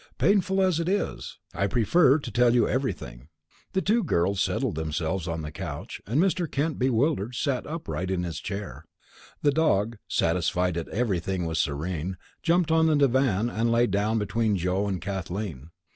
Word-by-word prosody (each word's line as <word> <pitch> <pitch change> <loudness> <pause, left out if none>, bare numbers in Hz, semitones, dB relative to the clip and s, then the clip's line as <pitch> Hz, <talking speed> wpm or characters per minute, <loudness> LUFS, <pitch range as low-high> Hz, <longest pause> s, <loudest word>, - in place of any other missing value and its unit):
Painful 195 -1 +3
as 185 -4 +2
it 170 +1 -1
is, 200 0 -2 0.2
I 100 - 0
prefer 130 - +4
to 140 -6 -6
tell 120 +2 +4
you 120 - +4
everything." 125 - -3 0.5
The 190 - +1
two 220 +6 +2
girls 95 - +1
settled - - 0
themselves 80 +3 -2
on 80 -1 -3
the 75 - -5
couch 80 +3 -6
and 120 +8 +1
Mr. 180 -2 +1
Kent, 150 +2 -1
bewildered, 125 -2 +1
sat 135 0 -1
upright 95 - -4
in 95 -2 -1
his 85 -2 -4
chair. 95 -8 -6 0.6
The 145 - +5
dog, 115 -8 +1
satisfied 90 +1 +1
that 85 0 -4
everything 95 -5 -1
was 80 -1 -1
serene, 85 +4 -3 0.2
jumped 170 0 +2
on 160 0 +4
the 155 - +3
divan 130 -6 +2
and 115 0 0
lay 120 +1 +4
down 105 +2 0
between 105 0 0
Joe 90 +3 0
and 95 -2 -2
Kathleen. 95 -5 -5
105 Hz, 170 wpm, -26 LUFS, 90-140 Hz, 0.6 s, The